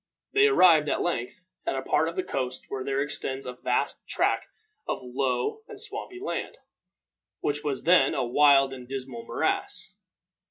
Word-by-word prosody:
They 415 Hz, +1 st, +6 dB
arrived, 170 Hz, -, +5 dB
at -, -, 0 dB
length, 170 Hz, -2 st, -3 dB, 0.2 s
at -, -, -1 dB
a 135 Hz, -, -3 dB
part 150 Hz, +4 st, +2 dB
of 165 Hz, -, -8 dB
the 185 Hz, -, -1 dB
coast 130 Hz, -1 st, -3 dB
where 130 Hz, -, -4 dB
there 135 Hz, +1 st, 0 dB
extends 135 Hz, -2 st, -4 dB
a 125 Hz, -, -5 dB
vast 125 Hz, 0 st, -2 dB
tract -, -, 0 dB, 0.4 s
of -, -, -1 dB
low 125 Hz, -, -1 dB
and 430 Hz, -3 st, -9 dB
swampy 420 Hz, -3 st, -2 dB
land, 410 Hz, -, -4 dB, 0.8 s
which 145 Hz, 0 st, -1 dB
was 140 Hz, -3 st, -1 dB
then 170 Hz, -5 st, +5 dB
a -, -, 0 dB
wild 135 Hz, +1 st, +5 dB
and 125 Hz, -2 st, -9 dB
dismal 130 Hz, -3 st, -6 dB
morass. -, -, -2 dB
135 Hz, 165 wpm, -27 LUFS, 130-170 Hz, 0.8 s, They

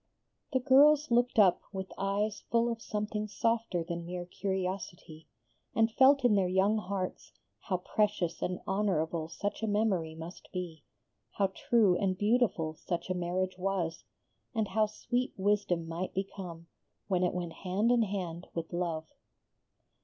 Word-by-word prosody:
The 260 Hz, -, +2 dB
girls 290 Hz, +2 st, +5 dB
looked 240 Hz, 0 st, +3 dB
up 195 Hz, -5 st, +6 dB
with 190 Hz, -1 st, -5 dB
eyes 200 Hz, +2 st, -1 dB
full 235 Hz, +1 st, +2 dB
of 230 Hz, -1 st, -5 dB
something 210 Hz, 0 st, -3 dB
softer 225 Hz, -4 st, 0 dB
than 170 Hz, +1 st, -4 dB
mere 175 Hz, +1 st, -5 dB
curiosity, 185 Hz, -4 st, -4 dB, 0.5 s
and 225 Hz, 0 st, +3 dB
felt 270 Hz, +2 st, +5 dB
in 240 Hz, -, +5 dB
their 195 Hz, -3 st, +3 dB
young 195 Hz, +4 st, +3 dB
hearts 190 Hz, -2 st, -4 dB, 0.3 s
how 185 Hz, -4 st, -1 dB
precious 185 Hz, -2 st, 0 dB
and 180 Hz, 0 st, -2 dB
honorable 175 Hz, -5 st, 0 dB
such 205 Hz, +6 st, -4 dB
a 220 Hz, -, -1 dB
memory 200 Hz, -7 st, +1 dB
must 165 Hz, +3 st, -9 dB
be, 175 Hz, -4 st, -5 dB, 0.5 s
how 195 Hz, -2 st, +1 dB
true 215 Hz, -6 st, +3 dB
and 185 Hz, -1 st, 0 dB
beautiful 205 Hz, -7 st, +2 dB
such 175 Hz, +3 st, -4 dB
a -, -, +3 dB
marriage 180 Hz, +1 st, -2 dB
was, 180 Hz, -3 st, -1 dB, 0.5 s
and 220 Hz, -2 st, 0 dB
how 215 Hz, -1 st, +2 dB
sweet 245 Hz, +4 st, -2 dB
wisdom 195 Hz, -4 st, +1 dB
might 170 Hz, +3 st, -4 dB
become 185 Hz, -3 st, -5 dB, 0.4 s
when 185 Hz, -3 st, +1 dB
it 180 Hz, -, +1 dB
went 175 Hz, -2 st, -3 dB
hand 200 Hz, +5 st, 0 dB
in 245 Hz, -1 st, +4 dB
hand 185 Hz, -5 st, -3 dB
with 165 Hz, +1 st, -4 dB
love. 170 Hz, -2 st, -2 dB
190 Hz, 150 wpm, -31 LUFS, 175-215 Hz, 0.5 s, up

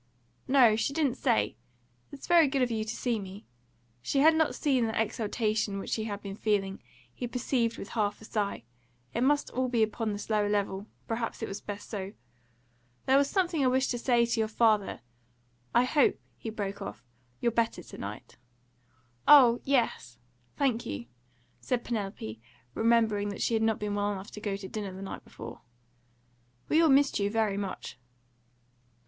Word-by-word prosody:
"No, 255 Hz, -5 st, +6 dB
she 230 Hz, +5 st, -1 dB
didn't 285 Hz, -5 st, +1 dB
say. 105 Hz, 0 st, +1 dB, 0.5 s
It's 285 Hz, -, -9 dB
very 340 Hz, -3 st, +6 dB
good 270 Hz, -1 st, +1 dB
of 245 Hz, -, 0 dB
you 220 Hz, -1 st, -1 dB
to 220 Hz, +1 st, -5 dB
see 240 Hz, -3 st, -1 dB
me." 195 Hz, +1 st, -9 dB, 0.6 s
She 275 Hz, -, +1 dB
had 320 Hz, +2 st, +7 dB
not 315 Hz, -1 st, +2 dB
seen 260 Hz, -6 st, +1 dB
the 220 Hz, -, -2 dB
exaltation 215 Hz, -2 st, -1 dB
which 195 Hz, -, -4 dB
he 220 Hz, -, -1 dB
had 205 Hz, -2 st, -5 dB
been 200 Hz, -1 st, -5 dB
feeling, 200 Hz, -2 st, -1 dB, 0.3 s
he 245 Hz, -, -4 dB
perceived 240 Hz, -1 st, -1 dB
with 200 Hz, -, -7 dB
half 210 Hz, -3 st, -1 dB
a 220 Hz, -, -12 dB
sigh; 210 Hz, -2 st, -2 dB, 0.5 s
it 235 Hz, -, -1 dB
must 290 Hz, +3 st, +2 dB
all 255 Hz, 0 st, 0 dB
be 235 Hz, -3 st, +3 dB
upon 220 Hz, 0 st, -1 dB
this 205 Hz, 0 st, -5 dB
lower 210 Hz, -2 st, +1 dB
level; 200 Hz, 0 st, -1 dB, 0.2 s
perhaps 230 Hz, 0 st, -3 dB
it -, -, -2 dB
was 195 Hz, -, -6 dB
best 205 Hz, 0 st, -7 dB
so. 200 Hz, -2 st, -5 dB, 0.9 s
"There 265 Hz, -, +4 dB
was 280 Hz, 0 st, +4 dB
something 345 Hz, -6 st, +1 dB
I -, -, +4 dB
wished 260 Hz, +1 st, +2 dB
to 240 Hz, -, -2 dB
say 240 Hz, -1 st, +3 dB
to 235 Hz, 0 st, -1 dB
your 220 Hz, -, +2 dB
father 215 Hz, -2 st, +2 dB, 0.7 s
I 240 Hz, -, +4 dB
hope," 275 Hz, +2 st, +3 dB, 0.2 s
he 225 Hz, -, -6 dB
broke 200 Hz, -2 st, -4 dB
off, 195 Hz, -, -7 dB, 0.3 s
"you're 235 Hz, -, +1 dB
better 230 Hz, -5 st, 0 dB
to -, -, -11 dB
night." 100 Hz, +1 st, -8 dB, 0.9 s
"Oh 250 Hz, -5 st, +8 dB
yes, 235 Hz, -, 0 dB, 0.4 s
thank 255 Hz, -5 st, +1 dB
you," 100 Hz, +4 st, -5 dB, 0.5 s
said 250 Hz, -2 st, -1 dB
Penelope, 195 Hz, -, -4 dB, 0.3 s
remembering 220 Hz, -, +2 dB
that 200 Hz, -, -6 dB
she -, -, +1 dB
had 220 Hz, -, +2 dB
not 220 Hz, -1 st, +2 dB
been 210 Hz, -1 st, -3 dB
well 205 Hz, 0 st, 0 dB
enough 195 Hz, 0 st, -6 dB
to 210 Hz, -, -9 dB
go 205 Hz, -2 st, -2 dB
to 195 Hz, -1 st, -8 dB
dinner 200 Hz, -2 st, -5 dB
the 190 Hz, +1 st, -8 dB
night 195 Hz, -, -7 dB
before. -, -, -10 dB, 1.1 s
"We 315 Hz, -, +5 dB
all 325 Hz, -, +5 dB
missed 275 Hz, -2 st, +4 dB
you 200 Hz, 0 st, +1 dB
very 215 Hz, -2 st, +1 dB
much." 195 Hz, -10 st, -5 dB
220 Hz, 180 wpm, -29 LUFS, 205-250 Hz, 1.1 s, Oh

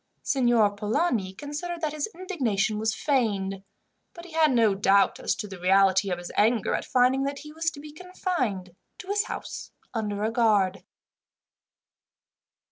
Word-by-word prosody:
Signor 240 Hz, -6 st, +3 dB
Polani 210 Hz, -, -1 dB
considered 295 Hz, -, -6 dB
that 305 Hz, -2 st, -1 dB
his 305 Hz, +5 st, -3 dB
indignation 235 Hz, -, -1 dB
was 220 Hz, 0 st, 0 dB
feigned, 200 Hz, -9 st, 0 dB, 0.5 s
but 340 Hz, 0 st, -10 dB
he 355 Hz, -, -12 dB
had 315 Hz, -2 st, +3 dB
no 230 Hz, -5 st, +4 dB
doubt 195 Hz, 0 st, +3 dB
as -, -, 0 dB
to 210 Hz, -, -5 dB
the 195 Hz, -2 st, -9 dB
reality 190 Hz, +1 st, +4 dB
of 180 Hz, -, -1 dB
his 175 Hz, 0 st, -8 dB
anger 220 Hz, 0 st, +2 dB
at -, -, -2 dB
finding 255 Hz, +1 st, +3 dB
that 280 Hz, 0 st, -3 dB
he 300 Hz, +1 st, -10 dB
was 325 Hz, +1 st, 0 dB
to 305 Hz, -, -12 dB
be 300 Hz, +1 st, -10 dB
confined 285 Hz, -, -3 dB, 0.2 s
to 375 Hz, -, -11 dB
his 410 Hz, +1 st, +1 dB
house -, -, -6 dB, 0.2 s
under 210 Hz, -3 st, -2 dB
a 220 Hz, -, 0 dB
guard. 205 Hz, -6 st, +2 dB
230 Hz, 160 wpm, -26 LUFS, 200-300 Hz, 0.5 s, no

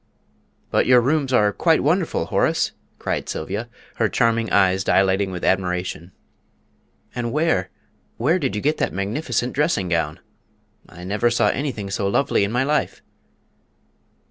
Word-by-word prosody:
"But -, -, +2 dB
your 125 Hz, -1 st, +7 dB
rooms 135 Hz, +2 st, 0 dB
are 105 Hz, -5 st, +3 dB
quite 165 Hz, -2 st, +2 dB
wonderful, 165 Hz, -, +1 dB
Horace!" -, -, +1 dB, 0.3 s
cried -, -, -3 dB
Sylvia, 100 Hz, +9 st, -4 dB, 0.3 s
her 115 Hz, -2 st, +2 dB
charming 115 Hz, -2 st, +1 dB
eyes 95 Hz, -1 st, +3 dB
dilating 95 Hz, 0 st, +2 dB
with 90 Hz, -2 st, -5 dB
admiration. 90 Hz, -2 st, -1 dB, 1.0 s
"And 120 Hz, -1 st, -3 dB
where, 150 Hz, -, +1 dB, 0.5 s
where 160 Hz, +10 st, +2 dB
did 135 Hz, -9 st, -2 dB
you 105 Hz, -, -3 dB
get 150 Hz, +2 st, +1 dB
that -, -, -1 dB
magnificent 120 Hz, +5 st, -2 dB
dressing 145 Hz, -, 0 dB
gown? 80 Hz, -3 st, -1 dB, 0.7 s
I 90 Hz, -, -12 dB
never 105 Hz, +5 st, +1 dB
saw 120 Hz, -, +2 dB
anything 120 Hz, -8 st, -3 dB
so 100 Hz, 0 st, -1 dB
lovely 100 Hz, -, +1 dB
in 100 Hz, -, -1 dB
my 125 Hz, +2 st, +1 dB
life!" 150 Hz, +2 st, -1 dB
115 Hz, 145 wpm, -22 LUFS, 95-135 Hz, 1.0 s, your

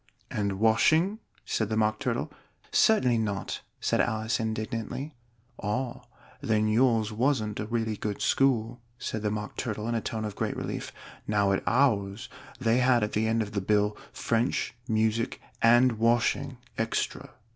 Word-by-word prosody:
"And 100 Hz, -1 st, -1 dB
washing?" 155 Hz, -, +3 dB, 0.3 s
said 110 Hz, -2 st, -1 dB
the 110 Hz, -, 0 dB
Mock 110 Hz, 0 st, +1 dB
Turtle. -, -, -2 dB, 0.4 s
"Certainly 125 Hz, -, +4 dB
not!" 105 Hz, -3 st, -3 dB, 0.2 s
said -, -, +2 dB
Alice 110 Hz, +2 st, 0 dB
indignantly. 115 Hz, +6 st, -3 dB, 0.5 s
"Ah! 120 Hz, +5 st, -2 dB, 0.4 s
then 110 Hz, 0 st, +1 dB
yours 115 Hz, -1 st, +3 dB
wasn't 110 Hz, -3 st, 0 dB
a 105 Hz, -, -3 dB
really 115 Hz, -1 st, -1 dB
good 105 Hz, -1 st, -3 dB
school," 120 Hz, -3 st, +1 dB, 0.2 s
said 110 Hz, -3 st, -4 dB
the 105 Hz, -, 0 dB
Mock 105 Hz, 0 st, -4 dB
Turtle 110 Hz, -2 st, -3 dB
in 120 Hz, -, -1 dB
a 115 Hz, -, 0 dB
tone 110 Hz, 0 st, -3 dB
of 105 Hz, -, -5 dB
great -, -, -2 dB
relief. -, -, -4 dB, 0.4 s
"Now 105 Hz, -2 st, +2 dB
at 95 Hz, -, +1 dB
ours 115 Hz, -3 st, +1 dB, 0.3 s
they 115 Hz, -2 st, +2 dB
had 125 Hz, -2 st, +4 dB
at 105 Hz, -, -1 dB
the 110 Hz, +1 st, +1 dB
end 115 Hz, 0 st, +2 dB
of 105 Hz, -, -8 dB
the 100 Hz, -1 st, -1 dB
bill, 105 Hz, +1 st, +2 dB, 0.2 s
'French, 115 Hz, +2 st, 0 dB
music, 110 Hz, +1 st, 0 dB, 0.2 s
and 120 Hz, 0 st, +5 dB
washing 120 Hz, +2 st, +1 dB, 0.2 s
extra.'" 115 Hz, 0 st, -2 dB
110 Hz, 155 wpm, -28 LUFS, 105-120 Hz, 0.5 s, and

